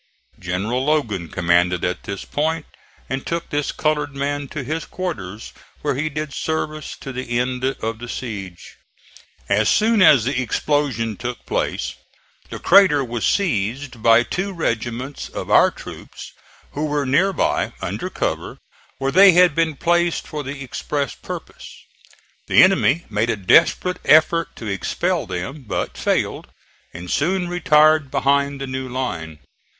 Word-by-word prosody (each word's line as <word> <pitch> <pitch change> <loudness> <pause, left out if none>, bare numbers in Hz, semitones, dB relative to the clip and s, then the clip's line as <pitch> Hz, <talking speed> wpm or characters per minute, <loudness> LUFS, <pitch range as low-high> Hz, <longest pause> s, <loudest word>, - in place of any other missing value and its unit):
General 100 +8 -2
Logan 115 - 0
commanded 90 0 +2
at 90 0 -3
this 100 0 -5
point 160 +1 -1 0.4
and 135 0 -3
took 170 0 -4
this 145 0 -1
colored 150 -2 -1
man 145 +1 -2
to 140 +1 -6
his 155 +5 -3
quarters, 110 - -6 0.3
where - - +1
he 145 +4 -2
did 150 -1 -5
service 155 -1 -3
to 135 - -7
the 125 -1 -3
end 125 +1 -1
of 115 -4 -2
the 120 0 -8
siege. 100 -9 -7 0.7
As 105 +2 +2
soon 220 0 +3
as 140 - +6
the 130 0 0
explosion 125 -5 -1
took 125 0 -6
place - - -2 0.6
the - - -6
crater 185 -8 +5
was 120 -2 -2
seized 125 - -1
by 115 +1 +6
two 190 +10 -3
regiments 125 -3 -3
of - - -6
our - - +6
troops - - -10 0.4
who 150 +2 -2
were 145 -1 -1
near 170 +10 +3
by, - - 0
under - - -4
cover, - - -3 0.4
where 135 0 -1
they 190 +4 +8
had 180 -2 +5
been 160 0 0
placed 175 +3 +1
for 150 -2 -4
the 135 +1 -6
express 140 +2 -3
purpose. - - -9 0.8
The - - +7
enemy 175 -4 +3
made 110 +2 -1
a 115 - +1
desperate 165 - +3
effort 160 +2 +4
to 115 - -9
expel 100 -4 -1
them, 95 - -5
but - - -3
failed, - - -1 0.4
and 85 +2 -8
soon 180 +4 0
retired 155 -4 +4
behind 140 +1 +1
the 135 - -3
new 130 0 -5
line. 85 -12 -4
135 Hz, 150 wpm, -21 LUFS, 115-155 Hz, 0.8 s, they